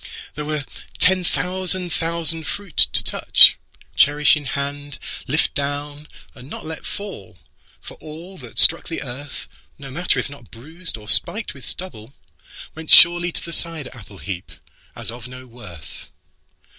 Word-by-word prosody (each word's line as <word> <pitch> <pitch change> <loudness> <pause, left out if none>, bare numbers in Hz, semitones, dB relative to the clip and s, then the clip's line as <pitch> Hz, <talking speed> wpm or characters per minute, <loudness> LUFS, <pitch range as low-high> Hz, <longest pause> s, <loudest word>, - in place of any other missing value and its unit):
There 150 +1 -7
were 150 -2 -5 0.3
ten 185 0 +2
thousand 180 0 -2
thousand 165 -1 0
fruit 200 -6 -8 0.2
to - - +1
touch, - - +6 0.4
Cherish 145 +1 +4
in 150 -1 -8
hand, 145 +1 -6 0.3
lift 150 +5 -1
down, 145 +1 -6 0.3
and 125 +2 -15
not - - -10
let 160 0 -9
fall. 195 - -8 0.4
For - - -13
allThat 155 -4 -12
struck 165 - +6
the 165 - -6
earth, 135 +2 -10 0.3
No 135 -2 -12
matter 175 +6 -1
if - - -3
not 140 -5 -15
bruised 160 +7 -8
or 105 -1 -15
spiked 215 - +2
with 140 - -15
stubble, 135 -9 -9 0.6
Went 160 0 -11
surely 175 +1 +7
to - - -7
the 170 - -8
cider 165 -7 -4
apple 105 -4 -14
heapAs 95 +3 -8
of 120 0 -11
no 130 0 -13
worth. 115 -10 -14
150 Hz, 145 wpm, -19 LUFS, 130-170 Hz, 0.6 s, surely